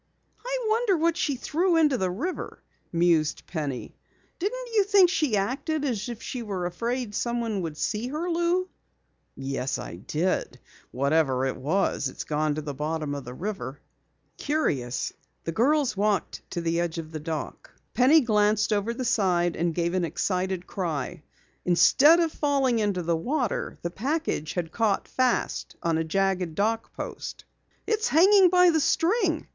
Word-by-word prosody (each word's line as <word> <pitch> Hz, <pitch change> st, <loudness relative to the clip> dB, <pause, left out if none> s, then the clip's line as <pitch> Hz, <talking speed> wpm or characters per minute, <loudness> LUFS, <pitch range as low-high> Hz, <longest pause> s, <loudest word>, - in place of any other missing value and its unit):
"I -, -, -2 dB
wonder 435 Hz, -3 st, +2 dB
what 330 Hz, +1 st, +2 dB
she 290 Hz, -5 st, 0 dB
threw 335 Hz, +7 st, +1 dB
into 300 Hz, -4 st, +4 dB
the 190 Hz, -6 st, 0 dB
river?" 285 Hz, -, -5 dB, 0.3 s
mused 165 Hz, -2 st, +2 dB
Penny. 145 Hz, -7 st, -4 dB, 0.4 s
"Didn't -, -, -3 dB
you 420 Hz, -2 st, +5 dB
think 390 Hz, -3 st, +5 dB
she 295 Hz, -, +1 dB
acted 280 Hz, +9 st, -1 dB
as 235 Hz, -4 st, -2 dB
if 235 Hz, -2 st, -7 dB
she 250 Hz, -, -4 dB
were 195 Hz, -5 st, -3 dB
afraid 230 Hz, +5 st, -3 dB
someone 235 Hz, -3 st, -1 dB
would 160 Hz, -3 st, -5 dB
see 215 Hz, +8 st, -2 dB
her, 305 Hz, +6 st, -3 dB
Lou?" 345 Hz, +2 st, +1 dB, 0.7 s
"Yes, 135 Hz, -1 st, -3 dB
I 85 Hz, -, -7 dB
did. 160 Hz, -, -2 dB, 0.3 s
Whatever 135 Hz, -1 st, +1 dB
it 135 Hz, -, -1 dB
was, 150 Hz, 0 st, 0 dB
it's -, -, -7 dB
gone 150 Hz, 0 st, 0 dB
to 155 Hz, -, -4 dB
the 145 Hz, -1 st, -4 dB
bottom 150 Hz, +1 st, -3 dB
of 140 Hz, -2 st, -5 dB
the 125 Hz, +1 st, -8 dB
river." 160 Hz, -, -5 dB, 0.6 s
Curiously 140 Hz, -, -1 dB, 0.3 s
the 165 Hz, -, -3 dB
girls 270 Hz, -, +2 dB
walked 205 Hz, 0 st, 0 dB
to 175 Hz, -, -3 dB
the 170 Hz, 0 st, 0 dB
edge 170 Hz, -1 st, -2 dB
of 160 Hz, -1 st, -6 dB
the 155 Hz, -, -5 dB
dock. 155 Hz, 0 st, -5 dB, 0.2 s
Penny 285 Hz, +6 st, +6 dB
glanced 210 Hz, -2 st, +2 dB
over 210 Hz, +3 st, -1 dB
the 255 Hz, -, -3 dB
side 180 Hz, -6 st, +2 dB
and 170 Hz, -1 st, -1 dB
gave 170 Hz, 0 st, 0 dB
an 185 Hz, -1 st, +1 dB
excited 185 Hz, +1 st, -1 dB
cry. 170 Hz, -3 st, -3 dB, 0.4 s
Instead 285 Hz, -, +6 dB
of 330 Hz, -2 st, +1 dB
falling 275 Hz, -6 st, +1 dB
into 200 Hz, -4 st, 0 dB
the 170 Hz, 0 st, +1 dB
water, 250 Hz, -, -2 dB
the 170 Hz, -, -2 dB
package 255 Hz, -, -2 dB
had 170 Hz, -3 st, -3 dB
caught 220 Hz, -1 st, 0 dB
fast 255 Hz, -2 st, 0 dB
on 165 Hz, -1 st, +1 dB
a -, -, +1 dB
jagged 185 Hz, -1 st, 0 dB
dock 225 Hz, +3 st, 0 dB
post. -, -, -7 dB, 0.4 s
"It's 445 Hz, 0 st, +1 dB
hanging 380 Hz, +3 st, +6 dB
by 360 Hz, 0 st, +6 dB
the 320 Hz, -, +2 dB
string!" 350 Hz, -, +1 dB
205 Hz, 160 wpm, -26 LUFS, -, 0.7 s, Penny